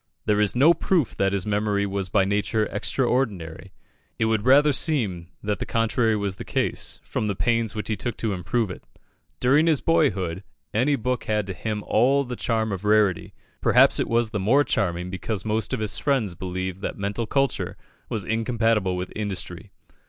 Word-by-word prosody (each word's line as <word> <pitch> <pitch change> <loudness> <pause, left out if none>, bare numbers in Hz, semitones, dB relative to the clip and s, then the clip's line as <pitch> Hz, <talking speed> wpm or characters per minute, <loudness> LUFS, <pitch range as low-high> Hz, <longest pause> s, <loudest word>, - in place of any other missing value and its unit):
There 105 0 +2
is 105 +1 +1
no 145 +7 +6
proof 170 - 0
that 95 0 +2
his 100 -2 -1
memory 105 -1 0
was 100 -1 -3
by 100 0 +3
nature 105 +2 0
extraordinary 105 -7 -1 0.5
it - - +1
would 110 -1 0
rather 145 +3 +6
seem 110 - -1 0.2
that 105 0 -1
the - - -3
contrary 115 0 +1
was 100 -2 -3
the - - -6
case, - - -2
from 110 - -3
the 100 - -1
pains 115 0 0
which 105 -2 -4
he 110 - 0
took 120 +4 -4
to 110 -3 -1
improve 95 +4 -1
it. - - -9 0.6
During 145 +6 +4
his 155 -4 +3
boyhood, 95 - +1 0.3
any 130 +7 +2
book 125 0 -2
had 105 -2 0
to 95 - -5
him 105 +3 -4
all 135 +5 +3
the 125 -2 -5
charm 110 -2 -1
of 95 0 -4
rarity; 105 -4 +2 0.3
perhaps - - +5
it - - 0
was 115 -1 +1
the 105 - -2
more 125 +10 +4
charming 90 -8 -1
because 95 +2 -4
most 110 0 -1
of 130 - -1
his 105 -1 +1
friends 130 -10 0
believed 95 +1 -5
that - - -4
mental 100 +3 -3
culture 135 +2 -1 0.3
was 105 -4 -3
incompatible 110 -4 +1
with 90 0 -5
industry. 95 -3 -5
105 Hz, 185 wpm, -24 LUFS, 95-120 Hz, 0.6 s, no